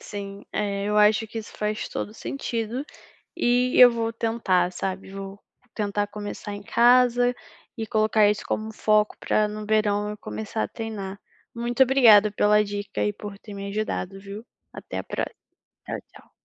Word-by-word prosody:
Sim. 200 Hz, -1 st, -7 dB
Eh, 200 Hz, -1 st, -1 dB
eu 210 Hz, 0 st, 0 dB
acho 210 Hz, +1 st, +4 dB
que 225 Hz, +1 st, -6 dB
isso 220 Hz, -, -8 dB
faz 210 Hz, 0 st, -2 dB
todo 210 Hz, -, -5 dB
sentido 235 Hz, 0 st, -4 dB, 0.5 s
e 245 Hz, +1 st, +2 dB
eu 250 Hz, -1 st, +10 dB
vou 230 Hz, -1 st, -1 dB
tentar, 215 Hz, -6 st, +1 dB
sabe? 190 Hz, +1 st, -4 dB
Vou 195 Hz, 0 st, -8 dB, 0.4 s
tentar 205 Hz, -1 st, -1 dB
começar 205 Hz, 0 st, -6 dB
em 205 Hz, -, -7 dB
casa 245 Hz, +2 st, +4 dB, 0.4 s
e 220 Hz, -1 st, -4 dB
colocar 215 Hz, -1 st, +3 dB
isso 210 Hz, -, -1 dB
como 215 Hz, -, -2 dB
um 220 Hz, -, -6 dB
foco 215 Hz, 0 st, +2 dB
para 215 Hz, 0 st, +1 dB
no 210 Hz, 0 st, -6 dB
verão 210 Hz, -1 st, +1 dB
eu 210 Hz, -, -6 dB
começar 110 Hz, -, -4 dB
a -, -, -2 dB
treinar. 200 Hz, -, -6 dB, 0.4 s
Muito 240 Hz, +2 st, +3 dB
obrigada 225 Hz, -6 st, +6 dB
pela 210 Hz, 0 st, +4 dB
dica 205 Hz, 0 st, -4 dB
e 210 Hz, -, 0 dB
por 205 Hz, -1 st, -8 dB
ter 210 Hz, -, -11 dB
me 200 Hz, 0 st, -6 dB
ajudado, 200 Hz, -2 st, -3 dB
viu? 200 Hz, +4 st, -9 dB, 0.3 s
Até -, -, -6 dB
a -, -, -5 dB
próxima, -, -, -4 dB, 0.5 s
tchau -, -, -4 dB, 0.2 s
tchau. -, -, -17 dB
210 Hz, 170 wpm, -25 LUFS, 200-225 Hz, 0.5 s, eu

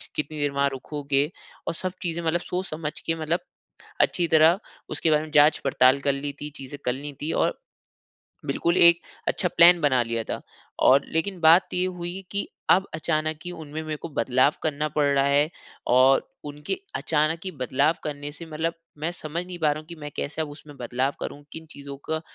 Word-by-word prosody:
कितनी 150 Hz, 0 st, -3 dB
देर 145 Hz, -, +1 dB
वहाँ 140 Hz, 0 st, +2 dB
रुकोगे, 140 Hz, +2 st, -1 dB, 0.4 s
और -, -, 0 dB
सब 185 Hz, +2 st, -2 dB
चीज़े 170 Hz, -1 st, -2 dB
मतलब 165 Hz, +2 st, +1 dB
सोच 180 Hz, +1 st, -3 dB
समझ 155 Hz, -1 st, -3 dB
के 165 Hz, -, 0 dB
मतलब 165 Hz, +3 st, 0 dB, 0.6 s
अच्छी 175 Hz, -, +2 dB
तरह 160 Hz, +3 st, +5 dB, 0.3 s
उसके 160 Hz, -, 0 dB
बारे 150 Hz, 0 st, +3 dB
में 155 Hz, -, -8 dB
जाँच 150 Hz, +1 st, +6 dB
पड़ताल 130 Hz, 0 st, +4 dB
कर 140 Hz, 0 st, +1 dB
ली 140 Hz, +1 st, -3 dB
थी, 150 Hz, +1 st, -5 dB
चीज़े 135 Hz, +1 st, -8 dB
कर 125 Hz, -, +1 dB
ली 145 Hz, +3 st, -6 dB
थी 155 Hz, -, -1 dB
और -, -, +1 dB, 0.9 s
बिल्कुल 170 Hz, +1 st, 0 dB
एक 170 Hz, 0 st, +8 dB, 0.3 s
अच्छा 180 Hz, -, +1 dB
प्लान 170 Hz, 0 st, +8 dB
बना 130 Hz, -4 st, +3 dB
लिया 115 Hz, -1 st, -2 dB
था। -, -, -4 dB, 0.4 s
और 135 Hz, +2 st, +7 dB
लेकिन 180 Hz, +3 st, -1 dB
बात 165 Hz, +3 st, +6 dB
ये 180 Hz, +1 st, +1 dB
हुई 180 Hz, +1 st, -5 dB
कि 200 Hz, +8 st, -2 dB, 0.2 s
अब 195 Hz, -, +5 dB
अचानक 155 Hz, -1 st, -1 dB
ही 180 Hz, -, -4 dB
उनमें 155 Hz, -2 st, -7 dB
मेरे 155 Hz, -1 st, -4 dB
को 170 Hz, -, -6 dB
बदलाव 130 Hz, 0 st, +2 dB
करना 155 Hz, -1 st, 0 dB
पड़ 150 Hz, 0 st, +1 dB
रहा 140 Hz, -1 st, +3 dB
है। 145 Hz, +2 st, +3 dB, 0.4 s
और 130 Hz, +2 st, +5 dB, 0.2 s
उनके 150 Hz, -, -4 dB, 0.2 s
अचानक 155 Hz, +1 st, +1 dB
ही 185 Hz, -, -3 dB
बदलाव 140 Hz, +5 st, +2 dB
करने 145 Hz, -1 st, -4 dB
से 165 Hz, +2 st, -9 dB
मतलब 160 Hz, +2 st, -2 dB, 0.3 s
मैं 160 Hz, +3 st, -1 dB
समझ 170 Hz, +1 st, -5 dB
नहीं 180 Hz, -1 st, -7 dB
पा 155 Hz, -, +2 dB
रहा 155 Hz, -, -6 dB
हूँ 155 Hz, -, -12 dB
की 170 Hz, -, -9 dB
मैं 150 Hz, -, -5 dB
कैसे 155 Hz, +2 st, -2 dB
अब 150 Hz, -, -7 dB
उसमें 145 Hz, 0 st, -12 dB
बदलाव 125 Hz, +3 st, -1 dB
करूँ? 145 Hz, -, -6 dB
किन 160 Hz, 0 st, -8 dB
चीज़ों 140 Hz, -1 st, -8 dB
का 160 Hz, 0 st, 0 dB
155 Hz, 200 wpm, -25 LUFS, 140-165 Hz, 0.9 s, एक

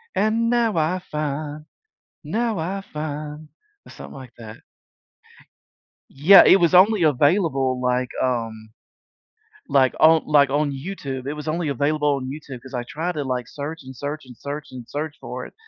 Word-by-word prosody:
And 225 Hz, +2 st, +1 dB
now 235 Hz, -6 st, +1 dB
I 165 Hz, +4 st, +1 dB
find, 150 Hz, 0 st, -4 dB, 0.6 s
now 230 Hz, -2 st, -1 dB
I 195 Hz, +4 st, -3 dB
find, 150 Hz, 0 st, -6 dB, 0.4 s
or -, -, -13 dB
something -, -, -11 dB
like 130 Hz, -3 st, -10 dB
that. 110 Hz, -1 st, -10 dB, 1.5 s
Yeah. 165 Hz, +9 st, +7 dB
It -, -, +7 dB
was 170 Hz, +1 st, +3 dB
only 195 Hz, +1 st, +6 dB
available, 145 Hz, -3 st, +2 dB
like, 125 Hz, 0 st, 0 dB
um 115 Hz, -3 st, -3 dB, 1.0 s
like, 130 Hz, -2 st, +3 dB
on, 160 Hz, 0 st, +6 dB
like, 145 Hz, -2 st, +4 dB
on 145 Hz, +1 st, +1 dB
YouTube. 135 Hz, -3 st, -6 dB
It 140 Hz, -, -2 dB
was 150 Hz, +1 st, -7 dB
only 160 Hz, 0 st, -1 dB
available 145 Hz, +1 st, +1 dB
on 130 Hz, -1 st, -5 dB
YouTube, 135 Hz, -3 st, -8 dB
'cause 130 Hz, 0 st, -12 dB
I 125 Hz, -, -2 dB
tried 160 Hz, +8 st, -4 dB
to, 150 Hz, -4 st, -4 dB
like, 125 Hz, -2 st, -3 dB
search, 150 Hz, +3 st, -7 dB
and 130 Hz, 0 st, -11 dB
search, 145 Hz, +2 st, -5 dB
and 125 Hz, -2 st, -13 dB
search, 145 Hz, +5 st, -7 dB
and 125 Hz, -2 st, -9 dB
search 150 Hz, +1 st, -4 dB
for -, -, -6 dB
it, -, -, -16 dB
150 Hz, 165 wpm, -22 LUFS, 130-160 Hz, 1.5 s, Yeah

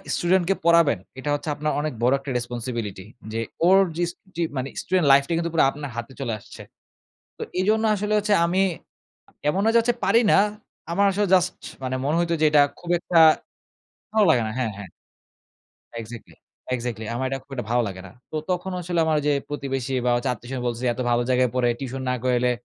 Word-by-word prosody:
Student 175 Hz, +1 st, +2 dB
কে 195 Hz, -, +3 dB
পড়াবেন, 170 Hz, -7 st, +5 dB, 0.2 s
এটা 145 Hz, -, -4 dB
হচ্ছে 150 Hz, +1 st, -5 dB
আপনার 150 Hz, +1 st, -1 dB
অনেক 150 Hz, -1 st, -2 dB
বড় 125 Hz, +2 st, +4 dB
একটা 140 Hz, 0 st, -6 dB
রেসপনসিবিলিটি। 120 Hz, -5 st, -5 dB, 0.3 s
যে 115 Hz, -, -1 dB, 0.3 s
ওর 190 Hz, +2 st, +6 dB, 0.2 s
যিস 175 Hz, 0 st, 0 dB, 0.2 s
যি 170 Hz, -, -2 dB, 0.2 s
মানে 130 Hz, +1 st, -2 dB
student 185 Hz, -3 st, +1 dB
life 140 Hz, 0 st, +6 dB
টাই 170 Hz, -, 0 dB
কিন্তু 170 Hz, 0 st, -2 dB
পুরা 165 Hz, -, +4 dB
আপনার 145 Hz, 0 st, -7 dB
হাতে 120 Hz, +3 st, -6 dB
চলে 125 Hz, -4 st, -2 dB
আসছে। -, -, -13 dB, 0.8 s
তো -, -, -10 dB, 0.2 s
এজন্য 215 Hz, +4 st, +2 dB
আসলে 210 Hz, +1 st, -2 dB
হচ্ছে 210 Hz, 0 st, +1 dB
আমি 180 Hz, +3 st, +1 dB, 0.9 s
এমন 190 Hz, +6 st, 0 dB
না -, -, +4 dB
যে -, -, +6 dB
হচ্ছে 240 Hz, +1 st, 0 dB
পারি 230 Hz, -, +4 dB
না। -, -, +6 dB, 0.5 s
আমার 200 Hz, +4 st, +2 dB
আসলে 205 Hz, +1 st, 0 dB
জাস্ট 180 Hz, 0 st, +2 dB, 0.3 s
মানে 130 Hz, 0 st, -2 dB
মনে 150 Hz, +3 st, +1 dB
হইত 170 Hz, 0 st, 0 dB
যে -, -, +5 dB
এটা 150 Hz, -1 st, +6 dB, 0.2 s
খুব 175 Hz, -, -10 dB
একটা 175 Hz, -, -1 dB, 1.0 s
ভালো 215 Hz, -1 st, +4 dB
লাগে 125 Hz, -7 st, +4 dB
না -, -, -4 dB
হ্যাঁ, 125 Hz, -4 st, -1 dB
হ্যাঁ। 100 Hz, -3 st, -9 dB, 1.1 s
Exactly, 115 Hz, +1 st, -10 dB, 0.4 s
exactly 120 Hz, -2 st, -5 dB
আমার 130 Hz, +2 st, -1 dB
এইটা 135 Hz, 0 st, -3 dB
খুব 135 Hz, +1 st, -19 dB
একটা 125 Hz, -5 st, -5 dB
ভালো 120 Hz, 0 st, +3 dB
লাগে 95 Hz, -1 st, -8 dB
না। -, -, -12 dB, 0.2 s
তো -, -, -3 dB
তখন 180 Hz, +1 st, -1 dB
আসলে 175 Hz, -1 st, -1 dB
আমার 160 Hz, -1 st, +1 dB
ঐযে 145 Hz, 0 st, +1 dB, 0.2 s
প্রতিবেশী 135 Hz, -3 st, -3 dB
বা -, -, +3 dB
হচ্ছে 120 Hz, +2 st, -1 dB
আত্বীয়স্বজন 125 Hz, +2 st, -6 dB
বলতেছে, 120 Hz, +1 st, -2 dB
"এত 130 Hz, -, -6 dB
ভালো 120 Hz, 0 st, +2 dB
জায়গায় 125 Hz, -1 st, +3 dB
পড়ে 125 Hz, -1 st, +2 dB
টিউশন 135 Hz, 0 st, -5 dB
না -, -, +1 dB
করাইলে 125 Hz, -1 st, +2 dB
140 Hz, 200 wpm, -24 LUFS, 125-175 Hz, 1.1 s, ওর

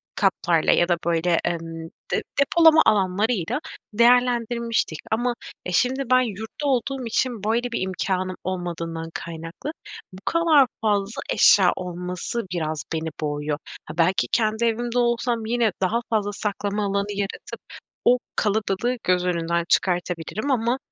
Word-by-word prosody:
katlarla 175 Hz, -4 st, +2 dB
ya 175 Hz, -, +3 dB
da, 175 Hz, -, +3 dB
böyle, 170 Hz, 0 st, +2 dB
emm, 165 Hz, -1 st, -4 dB, 0.2 s
de -, -, 0 dB, 0.2 s
depolama 320 Hz, +2 st, +6 dB
alanlarıyla 200 Hz, -, +1 dB, 0.3 s
değerlendirmiştik 235 Hz, -5 st, +2 dB
ama 240 Hz, +2 st, +1 dB, 0.3 s
e, 180 Hz, -, -3 dB
şimdi 260 Hz, +8 st, +1 dB
ben 255 Hz, 0 st, +6 dB
yurtta 220 Hz, +7 st, -5 dB
olduğum 265 Hz, 0 st, 0 dB
için 230 Hz, -2 st, -1 dB
böyle 235 Hz, +3 st, 0 dB
bir -, -, -2 dB
imkânım 185 Hz, 0 st, -2 dB
olmadığından 170 Hz, -3 st, -4 dB
kaynaklı, 165 Hz, -, -6 dB, 0.4 s
bu -, -, -10 dB
kadar 325 Hz, -5 st, +4 dB
fazla 205 Hz, -1 st, 0 dB
eşya 185 Hz, -3 st, +6 dB
olması 180 Hz, +5 st, -4 dB
biraz 155 Hz, -3 st, -2 dB
beni 160 Hz, 0 st, -2 dB
boğuyor. 145 Hz, 0 st, -2 dB, 0.3 s
Ha, 155 Hz, -, -8 dB
belki 180 Hz, +3 st, +2 dB
kendi 220 Hz, 0 st, +1 dB
evimde 240 Hz, +1 st, 0 dB
olsam 235 Hz, -1 st, 0 dB
yine 230 Hz, -1 st, +1 dB
daha 205 Hz, +5 st, +2 dB
fazla 210 Hz, -2 st, 0 dB
saklama 205 Hz, 0 st, -2 dB
alanı 200 Hz, +1 st, -1 dB
yaratıp 200 Hz, -1 st, -5 dB, 0.4 s
o 250 Hz, -, +6 dB, 0.2 s
kalabalığı 220 Hz, +3 st, 0 dB
göz 180 Hz, 0 st, +2 dB
önünden 170 Hz, -1 st, 0 dB
çıkartabilirim 180 Hz, -, 0 dB
ama, 240 Hz, 0 st, +1 dB
205 Hz, 130 wpm, -23 LUFS, 175-240 Hz, 0.4 s, depolama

